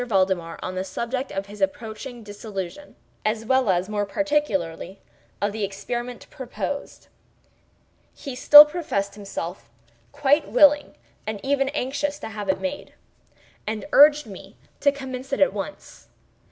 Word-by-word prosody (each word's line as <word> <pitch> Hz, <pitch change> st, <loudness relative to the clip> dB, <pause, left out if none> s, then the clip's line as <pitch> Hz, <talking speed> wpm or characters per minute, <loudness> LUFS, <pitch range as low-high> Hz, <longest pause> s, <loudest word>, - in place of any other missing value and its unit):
Valdemar 185 Hz, -5 st, 0 dB
on 185 Hz, -, -4 dB
the 185 Hz, 0 st, -2 dB
subject 235 Hz, +7 st, -4 dB
of 195 Hz, 0 st, -3 dB
his 205 Hz, +1 st, -12 dB
approaching 245 Hz, -4 st, -3 dB
dissolution, 205 Hz, +3 st, -7 dB, 0.3 s
as 215 Hz, +1 st, -1 dB
well 260 Hz, -2 st, +2 dB
as, 180 Hz, 0 st, +1 dB
more 210 Hz, -1 st, -1 dB
particularly, 200 Hz, -, -1 dB, 0.4 s
of 205 Hz, 0 st, 0 dB
the 215 Hz, 0 st, -4 dB
experiment 240 Hz, +5 st, -5 dB
proposed. 280 Hz, +1 st, -6 dB, 1.1 s
He 275 Hz, -, -7 dB
still 295 Hz, +3 st, +10 dB
professed 295 Hz, -, -3 dB
himself 190 Hz, -, -7 dB, 0.4 s
quite 290 Hz, +2 st, +2 dB
willing 295 Hz, 0 st, +4 dB, 0.3 s
and 215 Hz, -1 st, -3 dB
even 275 Hz, 0 st, +1 dB
anxious 285 Hz, +1 st, -2 dB
to 285 Hz, -, -7 dB
have 210 Hz, -2 st, -6 dB
it 190 Hz, -, +1 dB
made, 285 Hz, 0 st, -5 dB, 0.7 s
and 215 Hz, +2 st, -3 dB
urged 295 Hz, 0 st, +7 dB
me 195 Hz, -1 st, -12 dB, 0.2 s
to 285 Hz, -, +4 dB
commence 265 Hz, -1 st, -7 dB
it -, -, 0 dB
at 285 Hz, -, +4 dB
once. 210 Hz, +9 st, -8 dB
230 Hz, 140 wpm, -24 LUFS, 200-285 Hz, 1.1 s, still